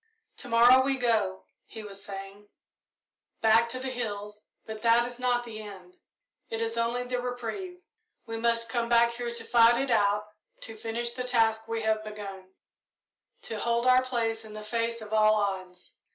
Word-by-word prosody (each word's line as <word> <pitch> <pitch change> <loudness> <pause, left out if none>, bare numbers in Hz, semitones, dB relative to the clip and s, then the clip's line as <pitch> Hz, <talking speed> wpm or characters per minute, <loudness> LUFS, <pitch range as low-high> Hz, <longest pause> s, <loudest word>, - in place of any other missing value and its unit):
"To 275 - -8
morrow 240 +3 +7
we 270 0 +1
go," 215 -6 0 0.2
he 220 - -9
was 200 -1 -9
saying, 200 +1 -9 0.9
"back 225 +1 +4
to 255 - -4
the 260 0 -4
hills, 210 -4 -5 0.2
but 220 -1 -7
that 235 0 +4
is 245 0 -6
not 245 -1 +1
the 220 -2 -8
end 190 -4 -12 0.5
it 225 - -3
is 230 0 -2
only 235 +1 0
the 250 0 -3
reprieve. 305 - -5 0.4
We 225 -1 -5
must 230 0 +1
come 235 0 -2
back 235 0 +5
here 240 0 -4
to 235 -1 -6
fight 235 +1 +5
it 270 -1 -1
out, 205 0 +2 0.4
to 225 - -6
finish 230 +2 -2
the 250 +1 -4
task 225 -3 +1
we 225 -1 -3
have 220 0 +1
begun, 200 -3 -8 0.9
to 220 - -5
hold 235 +2 0
our 255 0 +6
place 230 -3 -2
in 215 -1 -11
the 215 0 -8
face 230 +1 -2
of 215 0 -9
all 215 0 +5
odds. 185 -3 -3
230 Hz, 180 wpm, -28 LUFS, 215-240 Hz, 0.9 s, morrow